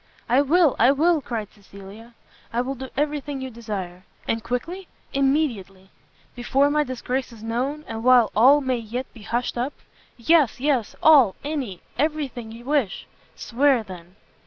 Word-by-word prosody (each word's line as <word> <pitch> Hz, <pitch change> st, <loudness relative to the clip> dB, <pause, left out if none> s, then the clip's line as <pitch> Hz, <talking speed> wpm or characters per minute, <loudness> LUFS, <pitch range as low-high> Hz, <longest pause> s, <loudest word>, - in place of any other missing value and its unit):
"I 250 Hz, +4 st, +4 dB
will! 310 Hz, +1 st, +3 dB
I 245 Hz, +4 st, +6 dB
will!" 315 Hz, +3 st, +2 dB
cried 225 Hz, -5 st, -5 dB
Cecilia, 205 Hz, +3 st, -14 dB, 0.4 s
"I 235 Hz, -, 0 dB
will 260 Hz, +2 st, -3 dB
do 265 Hz, 0 st, -8 dB
every 295 Hz, +1 st, 0 dB
thing 280 Hz, 0 st, -6 dB
you 260 Hz, -1 st, -6 dB
desire!" 195 Hz, -6 st, -6 dB, 0.2 s
"And 225 Hz, -1 st, -1 dB
quickly?" 330 Hz, +11 st, -4 dB, 0.3 s
"Immediately." 245 Hz, -, -1 dB, 0.4 s
"Before 270 Hz, +4 st, +1 dB
my 300 Hz, 0 st, +2 dB
disgrace 255 Hz, -1 st, -4 dB
is 225 Hz, -2 st, -13 dB
known? 260 Hz, +7 st, -3 dB
and 225 Hz, 0 st, -6 dB
while 250 Hz, -2 st, +5 dB
all 265 Hz, +7 st, +6 dB
may 260 Hz, -2 st, 0 dB
yet 235 Hz, +3 st, -5 dB
be 230 Hz, -, -14 dB
hushed 240 Hz, +3 st, -2 dB
up?" 260 Hz, +4 st, -2 dB, 0.4 s
"Yes, 280 Hz, +1 st, +3 dB
yes! 260 Hz, -5 st, 0 dB
all 275 Hz, -11 st, +6 dB
any 275 Hz, -, -4 dB, 0.2 s
every 305 Hz, 0 st, 0 dB
thing 240 Hz, -3 st, -9 dB
you 230 Hz, +2 st, -11 dB
wish!" 275 Hz, -9 st, -1 dB, 0.3 s
"Swear, 260 Hz, 0 st, +1 dB
then!" 180 Hz, -2 st, -12 dB
250 Hz, 160 wpm, -23 LUFS, 225-285 Hz, 0.4 s, I